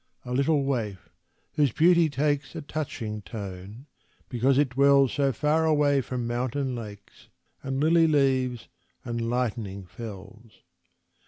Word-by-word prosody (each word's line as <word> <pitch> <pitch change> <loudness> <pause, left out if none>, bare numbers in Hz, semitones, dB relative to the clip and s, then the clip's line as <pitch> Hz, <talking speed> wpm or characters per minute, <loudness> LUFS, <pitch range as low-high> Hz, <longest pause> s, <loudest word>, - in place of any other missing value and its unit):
A 125 - -4
little 140 +2 +2
waif, 110 -9 -3 0.4
whose 145 -4 +2
beauty 170 +3 +4
takes 145 +1 -1
A 165 - -4
touching 115 -8 -5
tone 100 +3 -8 0.4
because 130 +2 +2
it 145 -2 +3
dwells 140 0 +4
So 140 -2 +1
far 150 +4 +1
away 145 -3 +3
from 125 -1 -4
mountain 125 +2 -2
lakes, 105 -4 -10 0.3
And 135 0 -3
lily 165 +2 +4
leaves, 130 -5 +1 0.4
and 115 -1 -3
lightening 110 -6 -2
fells. 110 +2 -11
130 Hz, 130 wpm, -26 LUFS, 115-145 Hz, 0.4 s, beauty